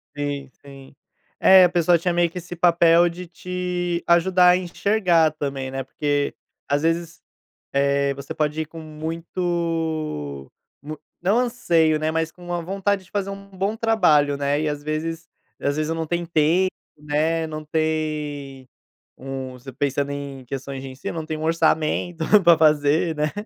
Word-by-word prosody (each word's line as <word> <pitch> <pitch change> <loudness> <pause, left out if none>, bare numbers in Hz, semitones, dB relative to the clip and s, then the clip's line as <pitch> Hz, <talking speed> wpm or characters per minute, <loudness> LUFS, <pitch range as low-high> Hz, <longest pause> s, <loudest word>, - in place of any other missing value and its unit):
Sim, 145 -2 -4
sim. 135 -1 -13 0.4
É, 190 -1 +8
a 180 - +5
pessoa 175 0 +3
tinha 175 +1 -1
meio 175 0 +2
que 170 - -10
esse 175 0 -7
papel 170 0 +5
de 175 +2 -8
te 175 0 -3
ajudar 180 +1 +5
a 180 - +5
enxergar 180 -2 +2
também, 140 -3 -4
né, 135 0 -3
porque, 145 +2 -1 0.3
às 145 +1 0
vezes, 165 0 -1 0.5
eh, 140 0 +1
você 140 0 -7
pode 155 +1 -1
ir - - -7
com 165 +1 -10
muito 160 - -3 0.3
mu 155 +1 -7 0.2
não 200 +6 +3
anseio, 170 -11 +2
né, 155 +1 0
mas 160 0 -1
com 180 - -18
uma 175 0 -3
vontade 195 +2 -1
de 185 - -23
fazer 200 -2 -2
um 195 0 -9
bom 195 +3 -2
trabalho, 170 -11 +3
né, 145 +1 0
e 155 - 0
às 145 -1 -4
vezes 160 +2 -4 0.3
às 140 0 -1
vezes, 155 0 -1
eu - - 0
não 165 0 -3
tempo, 170 +1 -3 0.7
né, 155 +2 0
não 155 -1 -6
tem 150 -4 -3 0.5
um 130 -1 -6 0.2
pensando 140 0 0
em 140 -2 -6
questões 135 +1 -6
de 135 - -7
ensino, 130 +5 -6
não 160 - -4
tem 155 0 -4
um 155 - -6
orçamento 160 +1 +1 0.2
para 170 -1 +7
fazer, 155 +1 +3
né, 150 0 0
160 Hz, 165 wpm, -23 LUFS, 145-175 Hz, 0.7 s, É